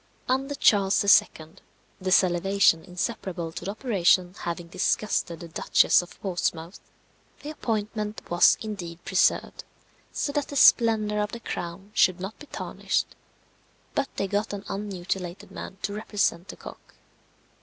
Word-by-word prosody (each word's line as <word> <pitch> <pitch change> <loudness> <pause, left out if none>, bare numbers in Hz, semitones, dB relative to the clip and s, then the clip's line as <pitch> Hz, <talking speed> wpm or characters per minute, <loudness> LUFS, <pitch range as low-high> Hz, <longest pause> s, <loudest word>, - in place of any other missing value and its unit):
Under 270 +3 0
Charles 200 -7 +3 0.2
II. 155 0 -13 0.5
the 185 0 -2
salivation 185 -1 +3
inseparable 180 -2 -4
to 170 - -8
the - - -3
operation 185 -5 +2
having 170 0 -4
disgusted 180 -1 -1
the 170 - -7
Duchess 160 - +3
of 175 - -14
Portsmouth, 175 -2 -3 0.6
the 295 - -5
appointment 215 -5 -3
was 175 0 +5
indeed 175 -6 -7
preserved, - - +1 0.5
so 285 - -2
that 290 -1 -1
the 285 - -8
splendour 220 -5 +5
of 210 +2 -2
the 235 - -5
crown 190 -1 -6
should 185 -4 +3
not 195 +4 -7
be 295 - -12
tarnished, - - -3 0.8
but 275 - -1
they - - -1
got 205 +2 -1
an 205 0 -6
unmutilated 190 -2 -5
man 190 - -8
to 200 - -2
represent 205 -4 -1
the - - -8
cock. - - -13
195 Hz, 140 wpm, -26 LUFS, 175-215 Hz, 0.8 s, was